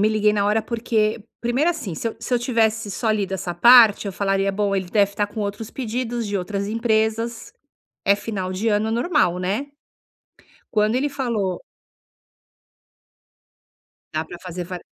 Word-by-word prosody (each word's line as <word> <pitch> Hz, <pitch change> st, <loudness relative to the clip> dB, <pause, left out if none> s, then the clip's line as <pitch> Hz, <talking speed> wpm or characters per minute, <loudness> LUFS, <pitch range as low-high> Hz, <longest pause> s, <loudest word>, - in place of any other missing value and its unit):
me 210 Hz, -, +4 dB
liguei 215 Hz, -1 st, +2 dB
na 205 Hz, -1 st, +1 dB
hora 210 Hz, +2 st, +2 dB
porque 225 Hz, -2 st, 0 dB, 0.2 s
primeiro 255 Hz, +8 st, +1 dB
assim 265 Hz, -, -5 dB
se 230 Hz, -, -2 dB
eu 225 Hz, -, -8 dB
se 240 Hz, -, -5 dB
eu -, -, +3 dB
tivesse 225 Hz, -3 st, +1 dB
só 220 Hz, +3 st, -1 dB
lido 205 Hz, -3 st, -1 dB
essa 180 Hz, -2 st, -3 dB
parte 225 Hz, +1 st, +7 dB
eu 195 Hz, -, -3 dB
falaria 195 Hz, 0 st, 0 dB
bom 200 Hz, 0 st, 0 dB
ele 190 Hz, -, -2 dB
deve 200 Hz, -2 st, +3 dB
estar 205 Hz, 0 st, 0 dB
com 215 Hz, +1 st, -7 dB
outros 205 Hz, +2 st, -4 dB
pedidos 240 Hz, -2 st, -3 dB
de 205 Hz, -, -2 dB
outras 200 Hz, +2 st, -3 dB
empresas 225 Hz, +1 st, -1 dB, 0.5 s
é 200 Hz, -, +5 dB
final 195 Hz, -3 st, -4 dB
de 200 Hz, +5 st, -1 dB
ano 215 Hz, +1 st, +1 dB
normal, 235 Hz, -, +1 dB
né. 200 Hz, +10 st, -2 dB, 1.0 s
Quando 215 Hz, 0 st, +2 dB
ele 285 Hz, +3 st, 0 dB
falou 230 Hz, -10 st, -2 dB, 2.5 s
dá 155 Hz, +1 st, -1 dB
pra 175 Hz, -, -9 dB
fazer 180 Hz, -1 st, -6 dB
va 180 Hz, +1 st, -6 dB
215 Hz, 165 wpm, -22 LUFS, 195-230 Hz, 2.5 s, parte